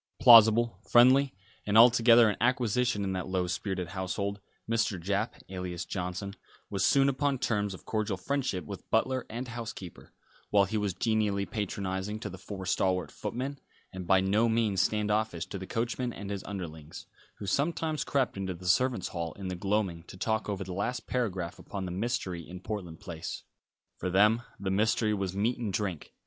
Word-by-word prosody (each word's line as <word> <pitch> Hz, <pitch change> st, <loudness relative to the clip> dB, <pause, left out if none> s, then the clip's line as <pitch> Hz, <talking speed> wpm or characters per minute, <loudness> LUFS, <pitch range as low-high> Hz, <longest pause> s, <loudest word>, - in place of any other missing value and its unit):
Plausible, 115 Hz, -3 st, +7 dB
friendly, 130 Hz, +2 st, +6 dB, 0.3 s
and 105 Hz, +1 st, +2 dB
altogether 115 Hz, 0 st, +7 dB
an 105 Hz, -, +1 dB
acquisition 120 Hz, -2 st, +1 dB
in 95 Hz, -1 st, -1 dB
that 90 Hz, -2 st, -3 dB
low 95 Hz, -1 st, 0 dB
spirited 90 Hz, 0 st, -3 dB
household, 100 Hz, +2 st, -3 dB, 0.3 s
Mr. 110 Hz, -4 st, 0 dB
Japp, 100 Hz, +5 st, -1 dB
alias 90 Hz, -2 st, -5 dB
Johnson, 90 Hz, +2 st, -4 dB, 0.4 s
was 100 Hz, -2 st, 0 dB
soon 135 Hz, +5 st, +4 dB
upon 140 Hz, 0 st, +1 dB
terms 105 Hz, -6 st, -1 dB
of -, -, -15 dB
cordial 110 Hz, -3 st, -1 dB
friendship 125 Hz, -, -2 dB
with -, -, -9 dB
butler 130 Hz, -1 st, +1 dB
and 120 Hz, +3 st, -5 dB
housekeeper, 115 Hz, -7 st, -8 dB, 0.4 s
while 100 Hz, -1 st, +4 dB
he 100 Hz, -, -5 dB
was 100 Hz, -3 st, -1 dB
genially 105 Hz, -1 st, +1 dB
patronising 100 Hz, 0 st, -3 dB
to 105 Hz, -2 st, -6 dB
the 95 Hz, -, -9 dB
four 95 Hz, +1 st, -7 dB
stalwart 90 Hz, 0 st, 0 dB
footmen, 135 Hz, +3 st, -4 dB, 0.3 s
and 95 Hz, -2 st, -6 dB
by 95 Hz, +1 st, +5 dB
no 105 Hz, +5 st, +2 dB
means 110 Hz, -5 st, +2 dB
stand 105 Hz, -1 st, +1 dB
offish 105 Hz, -6 st, 0 dB
to 100 Hz, -, -6 dB
the 95 Hz, -, -7 dB
coachman 120 Hz, +1 st, -2 dB
and 100 Hz, -2 st, -7 dB
his 100 Hz, -1 st, -4 dB
underlings, 80 Hz, -6 st, -7 dB, 0.3 s
who 105 Hz, -, -7 dB
sometimes 155 Hz, -, 0 dB
crept 135 Hz, -6 st, 0 dB
into 95 Hz, -2 st, -3 dB
the 90 Hz, +2 st, -12 dB
servants' 120 Hz, +1 st, +2 dB
hall 85 Hz, -3 st, -4 dB
in 95 Hz, -2 st, -6 dB
the 90 Hz, -, -3 dB
gloaming 95 Hz, -2 st, -1 dB
to -, -, -11 dB
talk 110 Hz, +2 st, -1 dB
over 100 Hz, -1 st, -2 dB
the 95 Hz, -1 st, -6 dB
last 115 Hz, +6 st, -2 dB
paragraph 95 Hz, -9 st, -2 dB
upon 100 Hz, -2 st, -5 dB
the 90 Hz, -, -4 dB
mystery 95 Hz, -3 st, -2 dB
in 90 Hz, +2 st, -9 dB
Portland 95 Hz, -5 st, -6 dB
Place. 80 Hz, -3 st, -6 dB, 0.5 s
For 90 Hz, -, -3 dB
them 105 Hz, +5 st, +4 dB, 0.2 s
the 95 Hz, -1 st, -2 dB
mystery 110 Hz, +2 st, +2 dB
was 95 Hz, -2 st, -2 dB
meat 110 Hz, +5 st, 0 dB
and 110 Hz, -4 st, -2 dB
drink. 95 Hz, -6 st, -3 dB
100 Hz, 180 wpm, -29 LUFS, 95-115 Hz, 0.5 s, Plausible